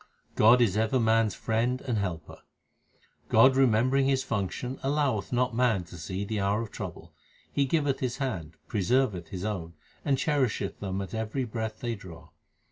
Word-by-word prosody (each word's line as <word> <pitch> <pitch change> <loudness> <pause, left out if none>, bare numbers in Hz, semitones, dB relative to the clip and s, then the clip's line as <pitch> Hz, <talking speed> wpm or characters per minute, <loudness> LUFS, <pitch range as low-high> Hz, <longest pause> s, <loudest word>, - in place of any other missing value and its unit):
God 120 +3 +6
is 105 -4 +2
ever 110 +4 +2
man 115 -1 +3
s 100 - -5
friend 120 +3 0
and 120 -5 -1
helper: 85 -6 -4 0.9
God 130 +4 +6
remembering 130 +1 +3
His 135 -1 +2
function 115 +4 -3
alloweth 135 -8 0
not 125 0 +1
man 115 -6 +2
to 85 - -12
see 95 +4 -4
the 105 0 -2
hour 100 +3 +1
of 110 - -8
trouble; - - -7 0.4
He 140 - +2
giveth 145 -2 +1
His 125 -2 -2
hand, 90 - -3
preserveth 105 -4 +1
His 90 +3 -5
own, 90 -6 -4 0.3
and 140 -2 +2
cherisheth 130 -9 0
them 95 -1 -3
at 95 - -9
every 110 +4 -2
breath 110 -2 -4
they 120 -1 -1
draw. 90 -6 -11
110 Hz, 170 wpm, -28 LUFS, 100-130 Hz, 0.9 s, God